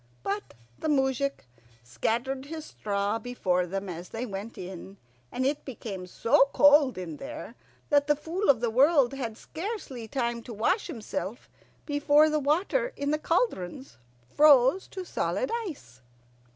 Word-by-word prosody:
But 200 Hz, -, -4 dB, 0.2 s
the -, -, -3 dB
moujik 275 Hz, -, 0 dB, 0.4 s
scattered 250 Hz, -, -2 dB
his 315 Hz, 0 st, -6 dB
straw 205 Hz, +1 st, -2 dB
before 185 Hz, -7 st, 0 dB
them 195 Hz, +2 st, -4 dB
as 175 Hz, 0 st, -7 dB
they 230 Hz, +2 st, -4 dB
went 205 Hz, +1 st, -7 dB
in, 190 Hz, +2 st, -8 dB, 0.3 s
and 260 Hz, -, -1 dB
it 285 Hz, +2 st, 0 dB
became 205 Hz, -8 st, -7 dB
so 235 Hz, +8 st, +3 dB
cold 290 Hz, -5 st, +6 dB
in 170 Hz, -5 st, -6 dB
there 300 Hz, +3 st, -8 dB, 0.4 s
that 285 Hz, 0 st, +4 dB
the 295 Hz, -, +4 dB
Fool 335 Hz, +7 st, -2 dB
of 250 Hz, -5 st, +5 dB
the 235 Hz, -2 st, 0 dB
World 275 Hz, +1 st, +4 dB
had 235 Hz, -5 st, -4 dB
scarcely 320 Hz, -, -6 dB
time 235 Hz, -1 st, -2 dB
to 230 Hz, 0 st, -9 dB
wash 300 Hz, -, +1 dB
himself 225 Hz, -, -5 dB, 0.3 s
before 295 Hz, +1 st, +4 dB
the 305 Hz, -, +2 dB
water 370 Hz, -, +1 dB
in 285 Hz, +1 st, -1 dB
the 305 Hz, -, +1 dB
cauldrons 280 Hz, -, -1 dB, 0.4 s
froze 290 Hz, +3 st, +6 dB
to 375 Hz, -2 st, -7 dB
solid -, -, -1 dB, 0.2 s
ice. 125 Hz, -, -10 dB
265 Hz, 150 wpm, -28 LUFS, 215-300 Hz, 0.4 s, cold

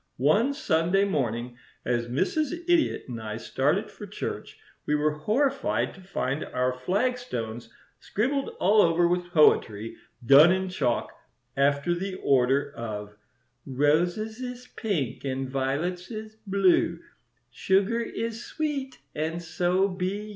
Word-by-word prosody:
One 210 Hz, -, +3 dB
Sunday 175 Hz, -, +2 dB
morning, 120 Hz, -, -2 dB, 0.3 s
as 120 Hz, -1 st, 0 dB
Mrs. 305 Hz, -, -1 dB
Idiot 345 Hz, -2 st, +2 dB
and 120 Hz, -3 st, -6 dB
I 110 Hz, 0 st, -5 dB
started 115 Hz, -, 0 dB
for -, -, -10 dB
church, -, -, -6 dB, 0.3 s
we 150 Hz, -, +2 dB
were 150 Hz, +1 st, +2 dB
horrified 270 Hz, -, 0 dB
to 190 Hz, -, -14 dB
find 155 Hz, -6 st, -2 dB
our 125 Hz, 0 st, -1 dB
flagstones 130 Hz, -, -2 dB, 0.3 s
scribbled 270 Hz, +6 st, -1 dB
all 210 Hz, +3 st, +5 dB
over 170 Hz, 0 st, +3 dB
with 175 Hz, 0 st, -1 dB
poetry, 115 Hz, -9 st, +3 dB, 0.3 s
done 145 Hz, +7 st, +8 dB
in 190 Hz, 0 st, 0 dB
chalk, 135 Hz, -10 st, -1 dB, 0.4 s
after 140 Hz, +4 st, +2 dB
the 185 Hz, +2 st, -3 dB
order 140 Hz, 0 st, +2 dB
of 105 Hz, -3 st, -6 dB, 0.5 s
"Roses 175 Hz, -, +1 dB
is 250 Hz, -1 st, -6 dB
pink, 170 Hz, -, -2 dB
and 135 Hz, -1 st, -2 dB
violets 140 Hz, +8 st, -2 dB
is 215 Hz, -1 st, -7 dB
blue, 190 Hz, -3 st, +3 dB, 0.5 s
Sugar 195 Hz, -, +1 dB
is 230 Hz, 0 st, -4 dB
sweet, 285 Hz, -4 st, -3 dB, 0.2 s
and 160 Hz, +2 st, -2 dB
so 180 Hz, +3 st, +1 dB
be 185 Hz, 0 st, -2 dB
you. -, -, -10 dB
175 Hz, 130 wpm, -27 LUFS, 135-215 Hz, 0.5 s, done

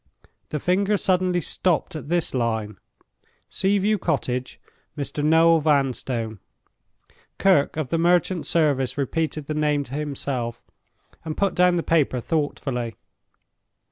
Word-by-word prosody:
The 150 Hz, -, -2 dB
finger 195 Hz, +6 st, +1 dB
suddenly 185 Hz, -2 st, +1 dB
stopped 170 Hz, +1 st, -1 dB
at 145 Hz, -2 st, -7 dB
this 175 Hz, -1 st, 0 dB
line: 110 Hz, -5 st, -1 dB, 0.7 s
"Sea 195 Hz, +1 st, +1 dB
view 205 Hz, +2 st, +1 dB
Cottage; 125 Hz, -5 st, -2 dB, 0.4 s
Mr. 145 Hz, +1 st, -3 dB
Noel 165 Hz, +2 st, +5 dB
Vanstone." 130 Hz, -7 st, 0 dB, 1.0 s
Kirke 170 Hz, -7 st, +3 dB
of 155 Hz, -5 st, -2 dB
the 165 Hz, -, 0 dB
merchant 175 Hz, 0 st, +2 dB
service 145 Hz, -6 st, +1 dB
repeated 155 Hz, +1 st, -2 dB
the 155 Hz, -, -3 dB
name 150 Hz, -1 st, +1 dB
to 135 Hz, -, -12 dB
himself, 135 Hz, -5 st, -3 dB, 0.6 s
and 155 Hz, -1 st, -5 dB
put 200 Hz, -2 st, +1 dB
down 180 Hz, 0 st, +4 dB
the 170 Hz, -, 0 dB
paper 150 Hz, -6 st, +2 dB
thoughtfully. 125 Hz, -5 st, -2 dB
150 Hz, 125 wpm, -23 LUFS, 130-175 Hz, 1.0 s, Noel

